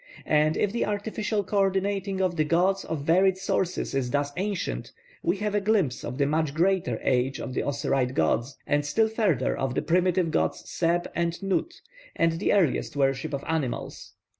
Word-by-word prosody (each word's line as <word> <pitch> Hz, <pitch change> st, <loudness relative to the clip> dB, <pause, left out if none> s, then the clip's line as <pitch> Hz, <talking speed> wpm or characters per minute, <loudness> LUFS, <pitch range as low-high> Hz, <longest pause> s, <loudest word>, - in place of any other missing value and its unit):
And 155 Hz, +1 st, +2 dB
if 205 Hz, -, +1 dB
the 235 Hz, -, 0 dB
artificial 210 Hz, 0 st, -2 dB
co 200 Hz, +2 st, -1 dB
ordinating 195 Hz, 0 st, 0 dB
of 185 Hz, -2 st, +1 dB
the 155 Hz, -, +2 dB
gods 180 Hz, +5 st, +2 dB
of 160 Hz, -3 st, -4 dB
varied 185 Hz, +4 st, +3 dB
sources 185 Hz, -3 st, -1 dB
is 135 Hz, -2 st, 0 dB
thus 145 Hz, +1 st, 0 dB
ancient, 195 Hz, 0 st, -3 dB, 0.3 s
we 345 Hz, -, 0 dB
have 210 Hz, -1 st, -2 dB
a 205 Hz, -, +1 dB
glimpse 195 Hz, -, +1 dB
of 125 Hz, +2 st, -5 dB
the 140 Hz, -, +2 dB
much 155 Hz, 0 st, 0 dB
greater 175 Hz, -, +1 dB
age 130 Hz, +1 st, +1 dB
of 130 Hz, -, -5 dB
the -, -, 0 dB
Osiride 135 Hz, -2 st, -1 dB
gods, 120 Hz, +4 st, 0 dB
and 145 Hz, 0 st, +1 dB
still 220 Hz, +10 st, +2 dB
further 215 Hz, -, +1 dB
of 130 Hz, -1 st, -2 dB
the -, -, 0 dB
primitive 180 Hz, 0 st, +2 dB
gods -, -, -1 dB
Seb 175 Hz, +1 st, 0 dB
and 170 Hz, 0 st, -1 dB
Nut, 195 Hz, -, -1 dB, 0.4 s
and 165 Hz, 0 st, +1 dB
the -, -, +1 dB
earliest 180 Hz, -10 st, +1 dB
worship 135 Hz, -2 st, 0 dB
of 140 Hz, -1 st, -3 dB
animals. 150 Hz, -7 st, -3 dB
170 Hz, 185 wpm, -26 LUFS, 145-195 Hz, 0.4 s, varied